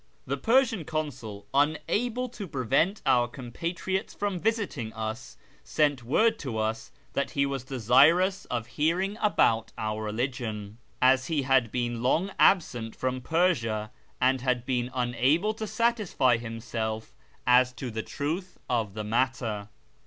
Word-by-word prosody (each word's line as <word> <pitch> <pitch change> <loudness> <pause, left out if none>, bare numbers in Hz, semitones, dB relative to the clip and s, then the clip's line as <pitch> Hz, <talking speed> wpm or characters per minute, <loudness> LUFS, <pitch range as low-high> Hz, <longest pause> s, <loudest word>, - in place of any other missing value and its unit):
The - - -1
Persian 230 -5 +2
Consul, 130 -10 -5
unable 160 - +1
to 210 -4 -7
prevent 150 - +1
our 125 -3 +4
compatriots 165 +10 -4
from 200 -3 -2
visiting 205 - -1
us, 110 +2 -5 0.3
sent 140 - +1
word 220 - +2
to 125 -7 -4
us 110 +1 -2 0.2
that 140 - 0
he 140 - +4
was 135 -2 -3
desirous 145 - +4
of 120 -2 -3
hearing 175 - 0
about 115 - +2
our 110 0 -2
religion, 110 -2 -3 0.2
as 130 0 +4
he 150 -4 0
had 130 -4 +3
been 120 -2 -2
long 160 +10 +1
absent 120 - +3
from 130 0 -2
Persia, 120 -10 +1 0.3
and 130 0 +2
had 125 -2 0
been 125 -2 -1
unable 130 - +2
to 220 0 -5
satisfy 210 - +2
himself 115 - -4 0.3
as 125 0 +5
to 125 -1 -6
the 110 0 -3
truth 165 - -4
of 110 -5 -1
the 105 - -3
matter. 110 -2 -1
130 Hz, 140 wpm, -28 LUFS, 115-170 Hz, 0.3 s, as